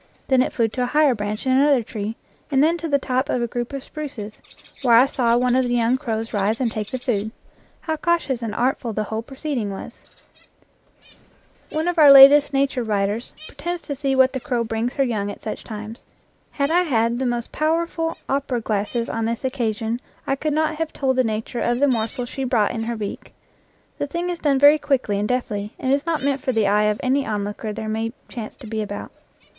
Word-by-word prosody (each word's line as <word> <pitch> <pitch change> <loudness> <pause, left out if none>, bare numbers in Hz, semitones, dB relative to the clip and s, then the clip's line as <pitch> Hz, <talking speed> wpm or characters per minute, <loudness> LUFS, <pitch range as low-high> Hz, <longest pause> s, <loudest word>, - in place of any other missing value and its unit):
Then 260 -1 +5
it - - 0
flew 230 -2 +1
to 250 - -4
a 245 - +1
higher 295 0 +4
branch 210 0 -4
in 260 - +2
another 270 -1 +4
tree, 215 0 -5 0.3
and 275 -1 +3
then 325 +2 +3
to 330 - -3
the 285 -2 +3
top 260 0 -1
of - - +1
a - - 0
group 240 +2 -4
of 275 -1 -5
spruces, 245 -10 -7 0.4
where 245 -4 +5
I 245 +3 +7
saw 240 -4 +1
one 250 0 +2
of 260 0 +3
the 245 - +1
young 235 +1 +2
crows 225 -4 -3
rise 205 +2 0
and 245 -4 0
take 215 -2 -4
the 260 - -3
food. 220 -4 -1 0.5
How 315 -1 -2
cautious 305 -6 0
and 220 -2 -4
artful 245 -1 0
the 215 - -1
whole 220 +1 -3
proceeding 265 -3 -4
was! 195 - -8 1.7
One 315 +2 -2
of 355 -1 0
our 295 -2 +9
latest 275 +1 +9
nature 270 -2 +1
writers 210 +1 -2
pretends 345 0 -5
to 285 - -4
see 270 0 -1
what 260 0 +4
the 260 - -2
crow 245 -2 -1
brings 225 +2 -2
her 275 - +2
young 215 -5 -1
at - - -7
such 215 - -6
times. 215 +1 -8 0.5
Had 280 +1 -1
I 350 +2 +4
had 235 -7 +1
the 260 - 0
most 240 -1 -2
powerful 325 +1 -1
opera 270 -2 -1
glasses 220 +2 -2
on 225 0 -2
this 230 +2 -2
occa 240 -4 -1
sion, 225 +3 -3 0.2
I 270 - 0
could 305 +3 -2
not 310 0 0
have 325 -1 -2
told 265 -2 0
the 255 - +4
nature 225 +2 -3
of 240 +1 0
the 285 - +4
morsel 245 0 -1
she 270 +2 -5
brought 235 -5 +2
in 225 -1 -3
her 235 0 -2
beak. 210 -2 -6 0.6
The 290 - -1
thing 345 +4 -2
is 345 - -5
done 285 -3 +2
very 290 +3 +7
quickly 255 -9 0
and 210 - -1
deftly, 215 -5 -2
and 260 +1 +1
is 285 +4 0
not 325 -4 0
meant 280 -1 0
for 260 - -1
the 220 -2 +2
eye 210 +1 +3
of 210 0 +1
any 270 +2 +2
onlooker 210 0 -3
there 220 +1 -5
may 225 +1 -2
chance 225 -4 -7
to 265 - -12
be 220 0 -3
about. 205 -1 -6
245 Hz, 225 wpm, -22 LUFS, 220-280 Hz, 1.7 s, our